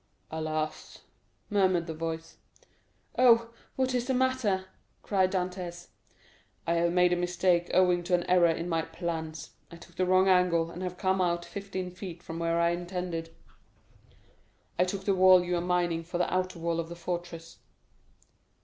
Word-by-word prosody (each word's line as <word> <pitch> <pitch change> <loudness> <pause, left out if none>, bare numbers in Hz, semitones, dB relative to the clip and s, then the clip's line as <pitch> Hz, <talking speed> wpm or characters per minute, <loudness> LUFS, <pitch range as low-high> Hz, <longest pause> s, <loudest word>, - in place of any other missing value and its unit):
"Alas!" 155 -1 -4 0.5
murmured 185 -4 +2
the 165 - -5
voice. 165 0 -5 0.8
"Oh, 235 -2 +5 0.2
what 260 -1 0
is 245 -1 -1
the 260 - +1
matter?" 250 -7 +1 0.4
cried 190 -2 +2
Dantès. 180 -2 -4 0.8
"I 170 - +1
have 170 0 +2
made 180 0 +4
a - - +3
mistake 175 0 +1
owing 180 -1 +4
to 180 0 +3
an 175 - -1
error 180 -1 +4
in 165 +1 -2
my 165 -2 0
plans. 160 -2 -5 0.2
I - - -11
took 170 0 -16
the 185 - +1
wrong 185 +1 +4
angle, 180 -3 +3
and 175 - -8
have 180 -1 -4
come 190 0 +1
out 175 -1 0
fifteen 190 -2 -5
feet 180 -2 -9
from 165 0 -6
where 165 0 0
I 170 0 +3
intended. 175 -1 -4 1.5
I 180 - +5
took 190 +1 -4
the 195 - +2
wall 185 -1 +6
you 180 0 -1
are 170 - 0
mining 175 -2 0
for 175 +1 -5
the 180 - 0
outer 185 -1 -1
wall 170 0 -1
of 165 0 -4
the 170 - -7
fortress." 170 -1 -6
175 Hz, 165 wpm, -29 LUFS, 170-185 Hz, 1.5 s, wall